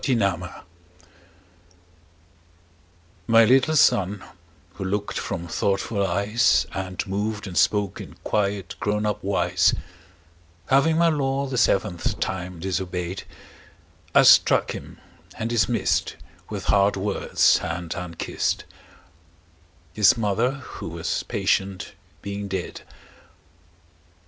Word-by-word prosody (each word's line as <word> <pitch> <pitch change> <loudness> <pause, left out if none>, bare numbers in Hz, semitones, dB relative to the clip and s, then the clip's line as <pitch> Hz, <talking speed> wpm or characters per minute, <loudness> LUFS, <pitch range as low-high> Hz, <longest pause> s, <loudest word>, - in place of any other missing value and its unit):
The 130 - +2
Toys 100 -6 +1 2.9
MY 115 -1 +6
little 135 +6 +3
Son, 100 - +3 0.5
who 95 - -6
look'd 100 +2 -2
from 85 - -4
thoughtful 100 +4 -1
eyes 100 +6 +2
And 95 -1 -4
moved 105 +2 -3
and 95 -3 -7
spoke 105 -1 +1
in - - -11
quiet 100 -3 -1
grown 105 +1 -1
up 105 -1 -2
wise, 90 -2 +2 0.9
Having 155 +4 +4
my 170 0 +4
law 140 -2 0
the 135 -1 -4
seventh 100 -6 +1
time 90 -2 -4
disobey'd, 90 0 -3 0.9
I - - +7
struck - - +5
him, - - -9 0.4
and 115 +1 -3
dismiss'd 120 0 +1 0.3
With - - -5
hard 100 0 +3
words 100 +1 +2
and 85 0 -4
unkiss'd, 90 -2 -3
5 - - -28 1.2
—His 105 +2 +5
Mother, 115 +3 +1
who 140 -2 -8
was - - -3
patient, 95 -1 -1 0.3
being 100 0 -5
dead. 95 -2 -5
100 Hz, 110 wpm, -24 LUFS, 95-115 Hz, 2.9 s, I